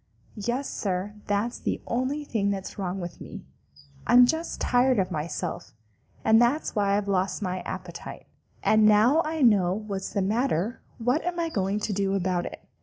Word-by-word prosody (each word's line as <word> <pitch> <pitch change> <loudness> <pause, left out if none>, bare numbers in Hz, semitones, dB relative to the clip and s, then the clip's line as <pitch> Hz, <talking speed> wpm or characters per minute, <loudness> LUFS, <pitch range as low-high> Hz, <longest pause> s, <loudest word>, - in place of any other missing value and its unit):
"Yes, 250 +5 -1
Sir, 190 +1 -3
that's 205 +4 -1
the - - -2
only 260 +5 -1
thing 215 -8 -1
that's 195 +1 -4
wrong 190 0 -2
with 175 -1 -7
me. - - -9 0.6
I'm 245 +1 +8
just 320 +6 -2
tired 250 0 +3
of 190 -2 0
myself, 160 0 -4 0.5
and 220 +1 +6
that's 245 +5 +1
why 200 -1 +2
I've 205 -1 -2
lost 190 0 0
my 185 -1 -2
appetite. - - -7 0.4
And 215 0 +5
now 220 +9 +5
I 315 -1 -1
know 195 -7 +4
what's 200 -2 -5
the 200 - 0
matter, 220 0 0 0.2
what 250 +6 +1
am 350 0 -2
I 335 -1 0
going 200 -5 -1
to 205 - -1
do 195 0 0
about 180 -2 0
it? - - -11
210 Hz, 175 wpm, -26 LUFS, 195-245 Hz, 0.6 s, I'm